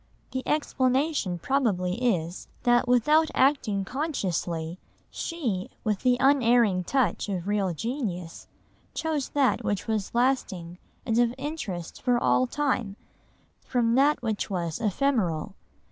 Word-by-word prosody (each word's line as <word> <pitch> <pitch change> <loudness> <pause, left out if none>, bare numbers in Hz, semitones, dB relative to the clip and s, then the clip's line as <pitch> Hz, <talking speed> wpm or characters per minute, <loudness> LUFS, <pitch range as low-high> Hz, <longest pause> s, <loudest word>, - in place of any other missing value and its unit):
The 260 - -2
explanation 265 - +1
probably 190 - 0 0.2
is, 170 +2 -6 0.2
that 240 0 +3
without 300 +6 +4
acting 240 -8 +2
consciously, 185 - -2 0.3
she, 240 - -3
with 210 -3 0
the 250 -1 +3
unerring 240 -8 +4
touch 240 -6 0
of 185 -2 -3
real 205 -3 +1
genius, 200 - -4 0.5
chose 310 -4 -1
that 275 -3 +2
which 205 -2 -1
was 220 -2 -2
lasting, 190 -9 0 0.3
and 230 -1 +1
of 240 0 +2
interest 245 - -5
for 245 -1 +2
all 255 +1 +2
time, 250 -7 -1 0.7
from 235 -2 +1
that 280 +2 +3
which 220 -3 -2
was 170 -4 -2
ephemeral. 210 - 0
235 Hz, 120 wpm, -27 LUFS, 185-270 Hz, 0.7 s, without